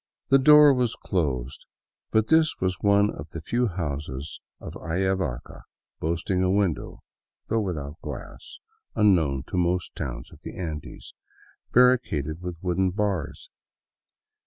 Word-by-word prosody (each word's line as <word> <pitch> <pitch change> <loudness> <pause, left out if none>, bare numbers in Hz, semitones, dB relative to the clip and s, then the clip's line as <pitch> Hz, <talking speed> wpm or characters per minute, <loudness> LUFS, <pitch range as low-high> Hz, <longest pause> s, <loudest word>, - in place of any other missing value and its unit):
The 135 - +6
door 150 +1 +8
was 125 -3 0
closed; 70 - -3 0.4
but 110 0 +1
this 160 -1 +4
was 95 -1 -1
one 100 0 +4
of 75 +2 -9
the 80 - -7
few 120 +8 0
houses 75 -5 -5 0.2
of - - -8
Ayavaca 90 -5 -2 0.4
boasting 85 +3 -1
a 95 - +2
window 95 -4 -1 0.2
— - - -61
though 115 0 +1
with 90 -5 -2
out 70 +2 -8
glass, - - -9 0.4
unknown 80 -10 +3
to - - -4
most 90 0 0
towns - - -6
of - - -16
the - - -9
Andes 80 -5 -7 0.3
— - - -30
barricaded 90 - +3
with 90 -1 -5
wooden 95 +1 +1
bars. 90 - -3
90 Hz, 140 wpm, -25 LUFS, 75-105 Hz, 0.4 s, door